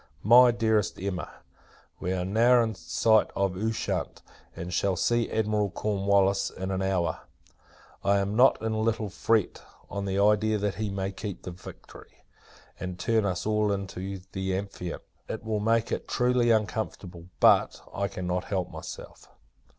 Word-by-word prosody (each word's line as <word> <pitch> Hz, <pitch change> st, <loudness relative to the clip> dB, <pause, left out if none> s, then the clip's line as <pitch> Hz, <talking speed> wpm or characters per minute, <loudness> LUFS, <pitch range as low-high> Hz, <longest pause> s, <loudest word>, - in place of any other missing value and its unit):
MY 120 Hz, +4 st, +8 dB
DEAREST 110 Hz, -3 st, +1 dB
EMMA, 95 Hz, -2 st, -3 dB, 0.7 s
We 90 Hz, -, -2 dB
are 90 Hz, -1 st, -1 dB
now 120 Hz, +5 st, +4 dB
in 110 Hz, -1 st, -2 dB
sight 110 Hz, +2 st, +2 dB
of 95 Hz, -2 st, 0 dB
Ushant, 110 Hz, +3 st, -3 dB, 0.3 s
and 90 Hz, +2 st, -6 dB
shall 95 Hz, +1 st, +1 dB
see 120 Hz, +5 st, +1 dB
Admiral 105 Hz, -2 st, 0 dB
Cornwallis 100 Hz, 0 st, +1 dB
in 95 Hz, +1 st, -5 dB
an 95 Hz, 0 st, -1 dB
hour. 95 Hz, -2 st, 0 dB, 0.8 s
I 100 Hz, 0 st, +3 dB
am 100 Hz, +1 st, -1 dB
not 125 Hz, +3 st, +5 dB
in 110 Hz, -, 0 dB
a 110 Hz, -, -1 dB
little 110 Hz, -2 st, -1 dB
fret, 110 Hz, 0 st, 0 dB, 0.3 s
on 100 Hz, 0 st, -3 dB
the 95 Hz, 0 st, -1 dB
idea 105 Hz, +1 st, +3 dB
that 105 Hz, -1 st, -1 dB
he 105 Hz, -, -1 dB
may 95 Hz, 0 st, -3 dB
keep 100 Hz, 0 st, -7 dB
the 90 Hz, -, -6 dB
Victory, 90 Hz, +1 st, -13 dB, 0.6 s
and 90 Hz, -1 st, -5 dB
turn 110 Hz, +3 st, +1 dB
us 95 Hz, -3 st, -2 dB
all 105 Hz, -1 st, +1 dB
into 95 Hz, -1 st, -4 dB
the 95 Hz, 0 st, -2 dB
Amphion. 95 Hz, -3 st, -6 dB, 0.3 s
It 110 Hz, -, -5 dB
will 110 Hz, -1 st, -1 dB
make 115 Hz, +2 st, +1 dB
it -, -, -3 dB
truly 125 Hz, -1 st, +2 dB
uncomfortable; 105 Hz, -5 st, -2 dB
but, -, -, +4 dB
I 100 Hz, -, -1 dB
cannot 90 Hz, -1 st, -3 dB
help 95 Hz, -3 st, -2 dB
myself. -, -, -9 dB
100 Hz, 160 wpm, -27 LUFS, 95-110 Hz, 0.8 s, MY